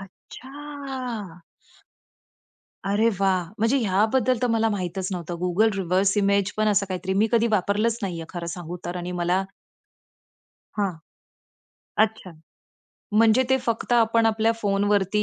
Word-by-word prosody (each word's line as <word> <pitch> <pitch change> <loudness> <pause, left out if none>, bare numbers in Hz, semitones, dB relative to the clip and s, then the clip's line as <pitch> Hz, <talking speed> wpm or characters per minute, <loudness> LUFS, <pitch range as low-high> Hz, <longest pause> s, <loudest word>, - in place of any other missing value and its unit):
अच्छा! 255 - -8 1.4
अरे 205 +3 +2
वाह! 190 -2 +2
म्हणजे 230 +5 +2
ह्याबद्दल 225 +4 +2
तर - - +3
मला 225 0 +2
माहीतच 185 -2 -3
नव्हतं. 175 -1 -4
Google 200 +5 +3
रिव्हर्स 190 +2 +1
इमेज 200 -1 +2
पण 215 0 +2
असं 205 -1 +2
काहीतरी 190 0 -3
मी - - +4
कधी 235 0 +4
वापरलंच 210 +3 +1
नाहीये 170 -4 -3
खरं 175 -2 -6
सांगू 175 0 -6
तर 175 +1 -4
आणि 180 0 -4
मला 180 +2 +2 1.4
हां. 195 -3 +1 1.1
अच्छा. 220 -4 -7 0.9
म्हणजे 230 +3 +5
ते 265 - +5
फक्त 230 +1 -1
आपण 230 -1 +4
आपल्या 225 +1 +2
फोनवरती 205 0 +1
205 Hz, 125 wpm, -24 LUFS, 185-225 Hz, 1.4 s, म्हणजे